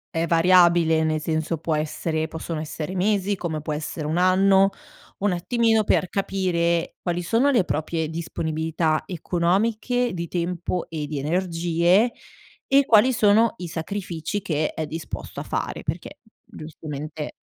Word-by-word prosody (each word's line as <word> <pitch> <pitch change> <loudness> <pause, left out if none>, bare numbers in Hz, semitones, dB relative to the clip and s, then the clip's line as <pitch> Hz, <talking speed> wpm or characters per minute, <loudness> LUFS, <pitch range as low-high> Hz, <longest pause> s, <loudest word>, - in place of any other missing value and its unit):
è 165 +1 0
variabile, 170 -1 +4
nel 155 0 0
senso 160 +1 -2
può 160 0 -1
essere 155 +1 -2
possono 160 0 -5
essere 155 +3 -5
mesi, 200 +1 +1
come 160 -5 -4
può 155 0 -3
essere 150 0 -4
1 160 +3 -1
anno, 190 +1 +4 0.5
un 205 -1 +2
attimino 225 +5 +2
per 190 - +2
capire 175 -4 0
quali 175 -1 -2
sono 235 +10 +2
le 235 -8 +3
proprie 160 0 -2
disponibilità 160 -1 -1
economiche, 205 +7 0
di 170 -1 -4
tempo 175 +1 -2
e 155 -3 -4
di 150 -1 -4
energie, 175 - +2 0.5
e 275 +1 +4
quali 235 +4 +5
sono 220 +1 +4
i 180 - -6
sacrifici 175 +2 -4
che 155 -5 -1
è 155 -1 -4
disposto 160 +1 -6
a - - -6
fare, - - -4
perché - - -5 0.3
giustamente 155 -1 -7
170 Hz, 140 wpm, -24 LUFS, 160-195 Hz, 0.5 s, quali